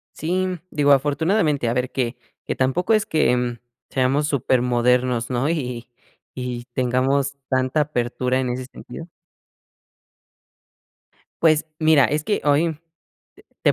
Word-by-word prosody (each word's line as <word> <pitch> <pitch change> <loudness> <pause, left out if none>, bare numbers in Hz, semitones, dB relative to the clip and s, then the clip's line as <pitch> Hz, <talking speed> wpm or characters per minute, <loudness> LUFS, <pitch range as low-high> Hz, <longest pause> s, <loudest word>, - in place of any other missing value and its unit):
Sí, 185 +4 -1 0.2
digo, 145 -1 +3
afortunadamente, 150 - +1
a - - +1
ver 125 +1 -1
que 125 -2 -2 0.3
que - - -3
tampoco 155 - +1
es 215 0 +2
que, 155 -5 +2
mm, 120 -1 -2 0.3
seamos 135 +3 +1
supermodernos, 125 -2 +1
¿no? 125 +4 0
Y 125 -7 -3 0.5
y 125 -1 -5
tengamos 130 +3 0
tanta 130 +3 +1
apertura 125 -2 -1
en 125 -1 -1
ese 125 +1 -4
sentido. 165 - -10 2.3
Pues 155 -1 +4
mira, 155 -4 +5
es 150 +3 0
que 205 - 0
hoy 150 +3 +3 0.9
te - - +4
130 Hz, 120 wpm, -22 LUFS, 125-150 Hz, 2.3 s, mira